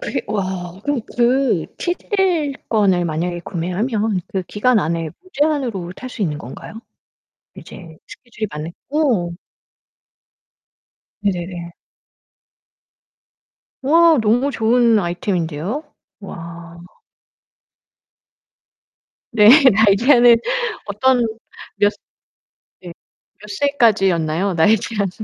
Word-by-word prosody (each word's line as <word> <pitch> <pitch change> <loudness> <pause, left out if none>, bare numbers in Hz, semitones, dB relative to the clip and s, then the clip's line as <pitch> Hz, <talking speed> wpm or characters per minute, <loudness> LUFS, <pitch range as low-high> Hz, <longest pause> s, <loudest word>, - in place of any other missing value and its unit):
그게 275 - -3
와 185 -3 -4
그럼 290 -3 0 0.2
그 245 - +2
7 350 0 -1 0.2
일권을 270 - +1
만약에 170 +2 -3
구매하면 200 +4 -2
그 190 -5 -3
기간 225 +4 +1
안에 165 -2 -2
무제한으로 275 - -2
탈 255 0 -9
수 220 - -5
있는 150 -5 -2
건가요? 155 - -10 0.8
이제 160 -3 -12
스케줄이 225 -3 -7
맞는 155 +3 -6 0.2
어. 250 - +1 1.9
네네네. 175 -3 -3 2.1
와 325 +3 +5
너무 240 +6 +2
좋은 230 -2 +3
아이템인데요. 175 - -3 0.4
와. 170 -2 -10 2.5
네, 210 -2 +5 0.2
나이제한은 235 +4 +5 0.5
어떤 235 +4 +2 0.5
몇 205 0 +3
스 - - -18 0.9
예 175 - -8 0.5
몇 210 - -12
세까지였나요 195 - +1
나이제한은? 200 +3 +1
205 Hz, 190 characters per minute, -19 LUFS, 175-245 Hz, 2.5 s, 와